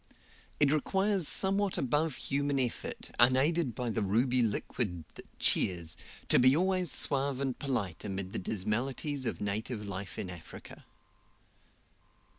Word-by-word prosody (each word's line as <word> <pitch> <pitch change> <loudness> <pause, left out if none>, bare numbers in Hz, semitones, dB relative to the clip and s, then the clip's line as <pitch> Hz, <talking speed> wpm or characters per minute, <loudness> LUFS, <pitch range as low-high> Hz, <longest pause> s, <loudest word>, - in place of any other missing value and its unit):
It 145 -2 +4
requires 190 +3 +1
somewhat 195 0 +2
above 145 +3 0
human 140 0 -1
effort, 125 -3 -3
unaided 130 +2 +3
by 120 -1 -2
the 110 - -1
ruby 120 +6 +2
liquid 105 -5 -2
that - - -12
cheers, 85 -3 +1 0.3
to - - +5
be 130 +3 +6
always 185 -2 +1
suave 140 -1 +1
and 135 -2 -2
polite 120 - -2
amid 95 -2 -4
the - - -2
dismalities 125 - -2
of - - -3
native 105 +2 -3
life 100 -1 -6
in 90 - -4
Africa. 85 -3 -11
130 Hz, 130 wpm, -31 LUFS, 105-145 Hz, 0.3 s, be